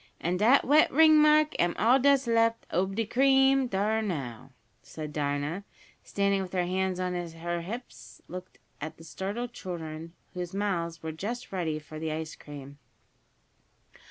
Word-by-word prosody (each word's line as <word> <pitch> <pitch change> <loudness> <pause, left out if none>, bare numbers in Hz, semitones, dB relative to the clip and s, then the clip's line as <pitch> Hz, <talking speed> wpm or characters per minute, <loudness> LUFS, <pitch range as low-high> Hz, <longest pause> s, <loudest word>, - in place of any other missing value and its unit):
An' 175 +2 -1
dat 235 +8 +5
wet 300 +4 +5
ringmark 305 0 +6
am 175 0 +2
all 240 +6 +4
dat's 275 0 +4
left 230 0 +2
ob 190 +3 0
de 225 +1 0
cream, 270 +2 +4
dar 215 +1 0
now!" 135 - -4 0.5
and 155 -1 -5
Dinah, 145 +5 -2 0.4
standing 200 -1 0
with 185 -1 -7
her 180 -1 +1
hands 185 0 -1
on 180 0 -1
her 170 0 -4
hips, 230 +8 -8
looked 185 +1 -9 0.2
at 155 +2 -6
the 165 - -13
startled 205 +9 -5
children, 165 -2 -7 0.2
whose 180 +1 -5
mouths 170 -5 -2
were 160 - -3
just 215 +10 -5
ready 170 -5 -1
for 155 0 -9
the 160 0 -3
ice 160 0 -4
cream. 145 -1 -11
185 Hz, 155 wpm, -28 LUFS, 165-230 Hz, 0.5 s, ringmark